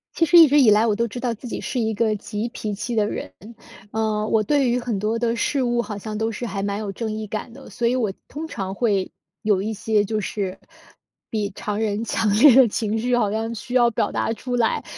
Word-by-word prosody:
其 330 - +2
实 345 - +6
一 330 -2 +10
直 290 +1 +4
以 245 - +6
来， 210 +2 +5
我 215 -3 +2
都 235 +2 0
知 240 +3 -7
道 245 -1 -1
自 230 +3 -10
己 - - -4
是 255 - -3
一 220 -1 0
个 215 0 +1
急 210 +2 -4
脾 215 -3 -5
气 235 +4 -4
的 210 -2 +2
人， 95 - -5 0.6
呃， 215 -1 -1
我 220 -1 +2
对 275 +3 +2
于 245 +1 +1
很 235 -4 -3
多 215 +3 0
的 230 0 0
事 270 +3 0
物， 240 -1 +1
好 215 -3 -6
像 215 +1 -6
都 225 +1 0
是 225 +3 -5
还 195 -3 -3
蛮 200 0 -2
有 210 -2 -4
正 220 +2 -4
义 215 0 -4
感 215 +4 -5
的。 270 +3 -13
所 235 - -1
以 245 - +1
我 220 -6 0
通 315 +2 -6
常 195 -9 -5
会 200 -4 0 0.3
有 205 -3 +1
一 220 +2 -2
些 210 0 +1
就 215 +1 -2
是 195 -2 -4 0.7
比 210 -2 -2
常 210 0 -3
人 215 0 -1
强 225 -1 0
烈 235 +5 +7
的 260 -2 +7
情 220 0 -1
绪， 245 +2 +1
好 210 -4 +1
像 225 +2 -2
需 245 +3 -8
要 240 -2 +5
表 210 -2 -1
达 - - -1
出 245 +3 -4
来。 235 -2 +1
220 Hz, 270 characters per minute, -22 LUFS, 210-240 Hz, 0.7 s, 一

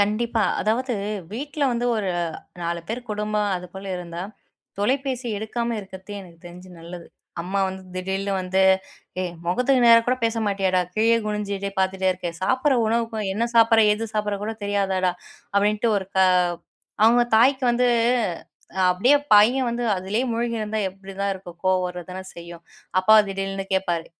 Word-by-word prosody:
கண்டிப்பா. 215 +2 +1 0.2
அதாவது 245 +4 0 0.4
வீட்ல 285 +5 -4
வந்து 240 +1 -1
ஒரு 200 -3 -1 0.5
4 170 0 -2
பேர் 230 +3 -3
குடும்பம், 210 0 -1
அது 180 0 -7
போல 190 +1 -8
இருந்தா 170 0 -6 0.6
தொலைபேசி 260 +3 -1
எடுக்காம 235 +2 -3
இருக்கிறது 190 +1 -11
எனக்கு 170 -3 -14
தெரிஞ்சு 180 +1 -12
நல்லது. 170 +1 -9 0.4
அம்மா 190 +3 -2
வந்து 190 0 -6
திடீர்னு 190 +2 -2
வந்து, 185 +1 0 0.6
"ஏய்! 180 -1 -2 0.2
முகத்துக்கு 250 +7 +2
நேரா 230 0 +8
கூட 250 +1 +2
பேச 225 0 0
மாட்டியேடா? 195 -2 +1
கீழே 225 +2 +3
குனிஞ்சுட்டே 200 -2 -3
பார்த்துட்டே 190 0 +1
இருக்கே! 180 -1 -3
சாப்பிடுற 260 +7 +2
உணவுக்கும், 225 -1 -1
என்ன 225 +4 0
சாப்பிடுற? 225 -1 +6
எது 215 +2 -2
சாப்பிட்ற 210 -1 -1
கூட 215 +2 -2
தெரியாதாடா?" 195 -2 0 0.4
அப்பிடின்ட்டு 210 +3 +2
ஒரு 190 - -8
க - - +3 0.9
அவுங்க 240 +2 +6
தாய்க்கு 260 +3 +4
வந்து 245 +1 +2 1.0
அப்பிடியே 200 +11 +4 0.2
பையன் 240 +5 +6
வந்து 235 +1 -2
அதிலேயே 195 +7 -1
மூழ்கியிருந்தா 230 -2 -2
எப்பிடிதான் 195 +1 -5
இருக்கும்? 185 -2 -10
கோவம் 185 0 +3
வர 180 0 -6
தானே 185 +1 -6
செய்யும். 170 0 -10 0.4
அப்பா 185 +4 +5
திடீர்னு 195 0 -3
கேட்பாரு, 175 -3 0
205 Hz, 145 wpm, -23 LUFS, 185-230 Hz, 1.0 s, நேரா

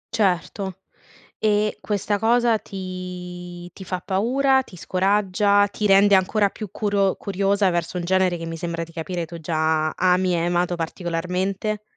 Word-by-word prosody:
Certo. 190 -2 0 0.6
E 210 0 +1
questa 205 0 -1
cosa 235 0 +3
ti 180 -2 -7
ti - - -12
fa 185 -1 -3
paura, 265 +7 +2
ti 190 - -14
scoraggia, 200 +2 +2
ti 210 +1 -2
rende 200 +1 +6
ancora 200 +2 +3
più 210 -1 -8
curo 200 -2 +1
curiosa 200 0 +1
verso 175 0 -2
un 175 - -2
genere 185 0 +2
che 165 - -6
mi 165 0 -5
sembra 165 0 -3
di 165 - -17
capire 170 +1 -4
tu 170 +1 -9
già 155 0 +1
ami 180 +1 +2
e - - +1
hai 170 - 0
amato 175 0 0
particolarmente? 180 +5 -2
185 Hz, 155 wpm, -23 LUFS, 175-205 Hz, 0.6 s, rende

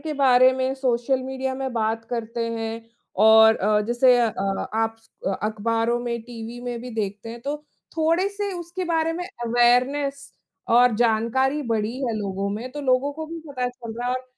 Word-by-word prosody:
के 310 +1 -4
बारे 255 -2 +6
में 260 +1 -1
सोशल 260 0 0
मीडिया 265 0 -3
में 265 -1 -4
बात 225 0 -1
करते 235 -1 -3
हैं 225 -1 -3 0.5
और 220 0 +7
अ, 210 +2 +2
जैसे 245 +1 +4
अ, 230 -2 +2 0.4
आप 225 0 0
स 225 - -26 0.3
अखबारों 225 +2 0
में, 235 -1 -3
टीवी 235 0 -8
में 240 -1 -4
भी 250 - -7
देखते 210 -1 -4
हैं 235 - -8
तो 285 +2 -2 0.4
थोड़े 330 +4 +2
से 405 0 -4
उसके 345 +2 -5
बारे 330 -1 +1
में 355 +2 -4 0.2
अवेयरनेस 255 +4 +2 0.4
और 245 -1 +6
जानकारी 240 +5 +1
बढ़ी 225 -1 -1
है 230 - -1
लोगों 200 -1 -3
में 225 +5 -5
तो 295 - -5
लोगों 265 +2 +2
को 315 +2 -6
भी 335 +1 -7
पता 250 -3 -2
चल 245 -2 -9
रहा 245 - -2
है 250 - +1
और 255 0 -4
245 Hz, 185 wpm, -24 LUFS, 225-270 Hz, 0.5 s, और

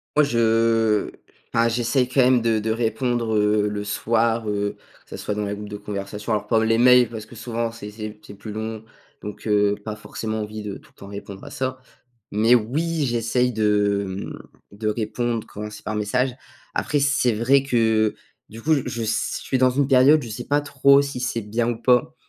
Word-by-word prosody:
Moi 150 - +6
je, 130 -5 -1
heu 115 -2 +2 0.4
enfin 115 0 +4
j'essaie 120 +2 +1
quand 130 +1 +2
même 125 -1 +4
de 110 -2 +2
de 110 - -3
répondre, 115 0 0
heu, 105 0 +2
le 105 0 -3
soir, 115 +2 0
heu, 100 -1 -2 0.3
que - - -28
ça - - -7
soit 105 - -3
dans 105 0 -2
les 100 0 -3
groupes 105 0 -8
de 105 - -6
conversation, 105 +1 -4
alors 105 -1 -1
pas 110 0 +3
les 115 0 +2
mails 125 -1 +6
parce 110 -2 -7
que 120 - -14
souvent 115 0 -3
c'est 115 -2 -9
c'est 105 0 -8
c'est 100 -1 -12
plus 105 +2 -8
long. 110 +1 -5 0.4
Donc 105 +2 -7
heu, 105 -1 +3
pas 110 -1 -5
forcément 110 +1 -5
envie 105 0 -6
de 105 -2 -6
tout - - -21
le - - -27
temps 100 - -10
répondre 100 -1 -9
à - - -9
ça. 130 0 -3 0.5
Mais 110 +4 +4
oui, 150 +8 0
j'essaye 120 0 +1
de 105 -2 +1
mmh 95 +1 -6 0.3
de 110 +2 -3
répondre 115 +1 -2
quand 105 +1 -7
c'est 105 - -11
par 105 - -3
message. 125 +5 0 0.4
Après, 145 - 0
c'est 140 -3 +2
vrai 130 +5 +3
que 135 -3 -2
heu, 110 -2 +3 0.3
du 115 +1 -11
coup 160 - +2
je 115 - -3
s 110 - -1
suis 130 - -1
dans 130 0 +5
une 140 +2 +1
période, 135 +3 +5
je 115 - -7
sais 120 +4 -5
pas 145 0 +2
trop 140 0 +4
si 140 -3 -5
c'est 120 -2 -2
bien 115 +3 -1
ou 120 - -1
pas. 125 +1 +2
115 Hz, 215 wpm, -23 LUFS, 105-125 Hz, 0.5 s, Moi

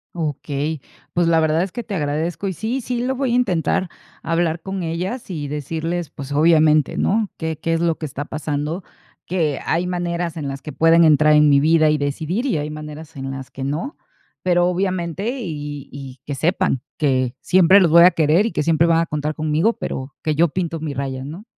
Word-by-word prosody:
Okey, 150 -1 -3 0.3
pues, 175 -1 +2
la 165 -1 +4
verdad 160 +1 +2
es 185 0 -2
que 240 - -5
te 210 - -7
agradezco, 160 +3 -2
y 190 - -2
sí, 230 +8 -3
sí 245 0 -2
lo 265 +1 -1
voy 265 -2 -1
a - - +3
intentar, 185 -5 +1 0.3
hablar 165 0 0
con 190 +1 -4
ellas 180 +9 -4
y 150 -6 -4
decirles, 160 +3 -3
pues, 140 0 -9
obviamente, 155 -1 +4
¿no?, 215 0 +1
que 160 -2 -4
qué 165 0 -1
es 165 - +1
lo 170 -1 +1
que 155 - -3
está 145 +2 -5
pasando, 155 +3 -3 0.4
que 160 -6 0
hay 170 +2 0
maneras 175 -2 -2
en 150 -3 -4
las 135 0 -6
que 150 - -6
pueden 165 +2 +5
entrar 155 -1 +5
en 150 0 +6
mi 140 -1 +5
vida 155 +1 +4
y 150 - +1
decidir 160 - -2
y 215 - +1
hay 150 +1 -3
maneras 155 +1 -9
en 135 0 -5
las 135 -1 -7
que 135 - -7
no. 160 - -3 0.5
Pero, 175 -1 +2
obviamente 185 +1 -1
y 145 - -6
y 135 -2 -9
que 145 - -4
sepan 170 -2 0 0.2
que 130 -4 +1
siempre 185 +1 +5
los 175 -5 +3
voy 170 +1 +8
a 180 - +8
querer 165 +7 +3
y - - -4
que - - -1
siempre 165 +1 +3
van 165 -1 +4
a 165 - +1
contar 150 -1 -3
conmigo, 155 +8 +1
pero 130 +1 -6
que 155 - +1
yo 170 +3 +3
pinto 165 -1 -3
mi 150 -2 -4
raya, 135 -1 -3
¿no? 160 +9 -8
160 Hz, 210 wpm, -21 LUFS, 150-175 Hz, 0.5 s, voy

